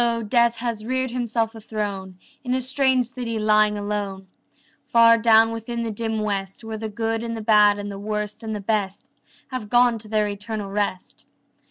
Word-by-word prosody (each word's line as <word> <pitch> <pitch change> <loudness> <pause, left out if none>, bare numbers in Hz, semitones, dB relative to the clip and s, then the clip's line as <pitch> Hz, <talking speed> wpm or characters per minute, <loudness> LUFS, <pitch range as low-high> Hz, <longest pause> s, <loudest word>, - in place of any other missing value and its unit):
Death 235 0 +3
has 230 -2 -3
reared 260 +2 -1
himself 235 -2 -1
a 225 - -11
throne 200 -3 -4 0.3
In 250 -1 -1
a 260 - 0
strange 260 -1 +2
city 245 -3 -4
lying 215 -1 +3
alone 205 -2 -4 0.6
Far 230 0 +6
down 225 0 +5
within 235 +1 -4
the 225 - -3
dim 220 0 -2
West, 195 0 -3
Where 220 -1 -6
the 220 0 -4
good 225 +1 -2
and 230 -1 -4
the 220 - -6
bad 210 -2 +5
and 205 0 -5
the 195 - -7
worst 210 +1 -4
and 220 -1 -4
the 205 - -5
best 200 -2 -2 0.4
Have 255 -5 -5
gone 240 -1 +4
to 215 - -8
their 215 -1 +1
eternal 205 0 -5
rest. 200 -2 -3
220 Hz, 185 wpm, -23 LUFS, 210-235 Hz, 0.6 s, Far